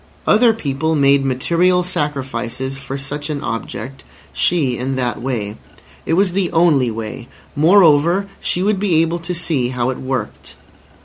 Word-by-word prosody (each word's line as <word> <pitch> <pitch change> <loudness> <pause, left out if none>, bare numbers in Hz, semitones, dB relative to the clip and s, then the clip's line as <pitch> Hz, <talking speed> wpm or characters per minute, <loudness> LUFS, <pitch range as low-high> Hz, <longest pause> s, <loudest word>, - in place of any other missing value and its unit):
Other 230 +2 +5
people 160 -6 -2
made 140 -1 +4
material 170 +8 +2
sacrifices 135 -6 -3
for 135 0 -6
such 145 +2 -4
an 150 -2 -2
object, 130 +3 -5 0.3
she 135 - +1
in 130 +2 -3
that 120 -4 -2
way. 110 -5 -3 0.5
It - - +1
was 190 +2 +3
the 185 -1 -1
only 160 -7 +3
way. 115 +1 -6 0.3
Moreover, 170 +2 +4
she 180 - -1
would 205 -1 +1
be 195 -4 +1
able 165 +1 -2
to 175 +2 -4
see 160 -7 0
how 125 0 -1
it 130 - -7
worked. 130 -5 -5
145 Hz, 150 wpm, -18 LUFS, 130-175 Hz, 0.5 s, Other